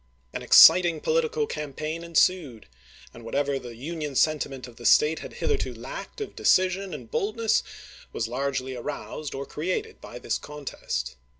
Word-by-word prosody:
An - - -4
ex - - +5
citing 175 -3 +8
political 465 -1 0
campaign 155 - -5
ensued, 165 - +1 0.5
and 115 - -12
whatever 140 +4 -1
the 120 -2 -10
Union 150 +2 -5
sentiment 135 -3 0
of 120 - -15
the 120 - -11
State 155 +2 +5
had - - -9
hitherto 435 -3 -2
lacked - - -8
of 425 - -6
decision 185 +1 +2
and 130 -8 -9
boldness 220 +2 +1 0.5
was 115 - -2
largely 130 +1 -3
aroused 145 +3 -6
or 135 +1 -4
created 185 - -4
bv - - -10
this - - -1
contest. 145 - -5
150 Hz, 155 wpm, -26 LUFS, 135-185 Hz, 0.5 s, citing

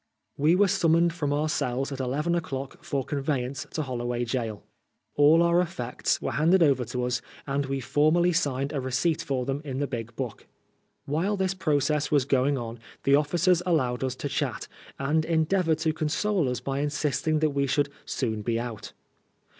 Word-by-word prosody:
We 155 +4 +3
were 200 +2 +4
summoned 170 -1 +3
from 150 -5 -2
our 150 +2 +1
cells 135 -2 -1
at 135 - -5
eleven 140 +6 -1
o'clock 135 -5 -4
for 135 -2 -2
conveyance 135 -2 -2
to 155 - 0
Holloway 120 -2 -2
Gaol. 115 -3 -3 0.5
All 155 +4 +5
our 170 +1 +4
effects 165 -9 -2
were - - -3
handed 170 +4 +4
over 135 -5 +3
to 125 +2 -3
us, 125 0 -1 0.2
and 140 0 -1
we 135 0 -2
formally 155 +7 +3
signed 140 -4 0
a 140 - -1
receipt 130 +5 0
for 130 -2 -2
them 135 +2 -2
in 135 -3 -5
the 145 - 0
big 120 -4 -6
book. 125 -5 -5 0.6
While 175 +9 0
this 190 -1 0
process 150 -4 +1
was 145 -4 +3
going 140 +1 +2
on 115 -1 -6 0.2
the 140 - +3
ofi&cers 170 +5 +3
allowed 135 -9 0
us 130 -1 -1
to 145 - -4
chat, 140 -2 -2 0.3
and 150 +3 +1
endeavored 160 +1 +1
to 160 - +2
console 160 +1 0
us 125 - -3
by 135 0 -2
insisting 150 +1 0
that 155 -1 +2
we 140 0 0
should 140 +1 +1
" - - -26
soon 110 -5 -2
be 115 +1 -1
out.' 115 -3 -6
145 Hz, 185 wpm, -27 LUFS, 130-160 Hz, 0.6 s, All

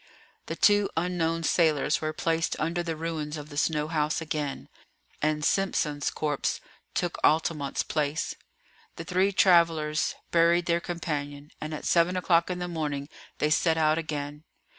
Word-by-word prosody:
The - - -3
two 205 -1 +4
unknown 165 -1 0
sailors 155 -3 +2
were 155 0 -1
placed 165 +1 0
under 165 +3 0
the 165 -2 -3
ruins 155 -1 -4
of 150 0 -8
the 145 - -10
snow 150 -1 +1
house 155 0 0
again, 150 -3 -4 0.5
and 150 0 0
Simpson's 150 -7 +1
corpse 150 -2 -1 0.4
took 175 -1 -1
Altamont's 155 -3 +1
place. 150 0 -1 0.6
The - - -6
three 185 +4 +1
travellers 165 -5 +3 0.2
buried 170 +1 +4
their 170 0 +1
companion, 145 -4 -4
and 155 - -4
at 155 - -6
seven 175 +2 +3
o'clock 170 -1 +2
in 180 - -2
the 180 0 -3
morning 150 -4 -3 0.3
they 150 - +1
set 160 +1 +3
out 155 0 +3
again. 150 -1 -5
160 Hz, 150 wpm, -27 LUFS, 150-170 Hz, 0.6 s, two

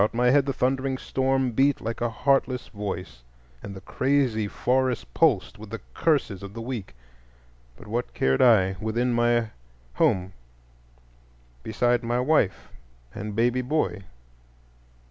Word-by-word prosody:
About 105 +3 +1
my 125 +1 +3
head 140 0 +3
the - - +1
thundering 130 0 0
storm 130 -1 0
beat 135 +4 +2
like 115 +1 -5
a 120 - +1
heartless 130 +1 0
voice, 95 - -6 0.4
and 100 - -8
the 95 - -9
crazy 130 -3 0
forest 125 +2 -1
pulsed 130 - +2
with 110 -1 -10
the 115 +1 -5
curses 140 - 0
of 100 +1 -9
the 115 - -5
weak; 115 - -6 0.8
but - - -13
what 115 +4 -4
cared 65 0 +2
I, 95 -6 +4
within 120 +3 0
my 120 -1 +2 0.4
home 95 +6 +1 1.3
beside 120 +2 +1
my 120 0 -1
wife 115 - +1 0.4
and 105 +1 -6
baby 120 +3 +2
boy? 125 -6 -1
120 Hz, 140 wpm, -25 LUFS, 105-130 Hz, 1.3 s, I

